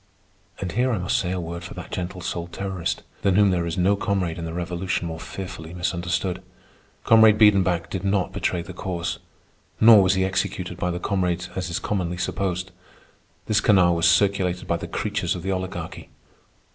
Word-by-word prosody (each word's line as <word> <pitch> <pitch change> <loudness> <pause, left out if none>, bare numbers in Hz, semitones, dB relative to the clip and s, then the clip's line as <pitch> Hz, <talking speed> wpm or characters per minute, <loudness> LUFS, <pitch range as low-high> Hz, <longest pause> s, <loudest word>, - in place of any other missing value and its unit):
And 95 -3 -3
here 125 +6 +1
I 115 - 0
must 90 -1 -1
say 90 - -2
a 95 - -2
word 85 0 -5
for 85 - -8
that - - -8
gentle 90 0 -4
souled 85 -1 -4
terrorist, 95 -1 -3 0.2
than 95 -2 +2
whom 100 -1 +5
there 85 -2 0
is 85 - -3
no 95 +3 +3
comrade 95 -4 -1
in 85 - -4
the 80 - -4
Revolution 90 +1 -2
more 80 0 -5
fearfully 85 -2 -7
misunderstood. 90 +1 -2 0.6
Comrade 110 -1 +6
Biedenbach 95 -5 +4
did 95 -1 -3
not 100 -1 0
betray 85 -1 -1
the 95 - -9
Cause. 85 -2 -3 0.6
Nor 110 -2 +9
was 95 0 +3
he 95 0 +2
executed 95 -2 -2
by 90 - -1
the 90 0 -2
comrades 90 -2 -1
as 90 -1 -3
is 85 - -2
commonly 90 -4 -2
supposed. 90 0 -2 0.7
This 110 - +2
canard 95 -4 +5
was 85 - +4
circulated 90 0 +2
by - - +1
the - - -6
creatures - - -2
of 90 - -7
the 95 - -1
Oligarchy. 95 0 -5
90 Hz, 185 wpm, -24 LUFS, 85-95 Hz, 0.7 s, Nor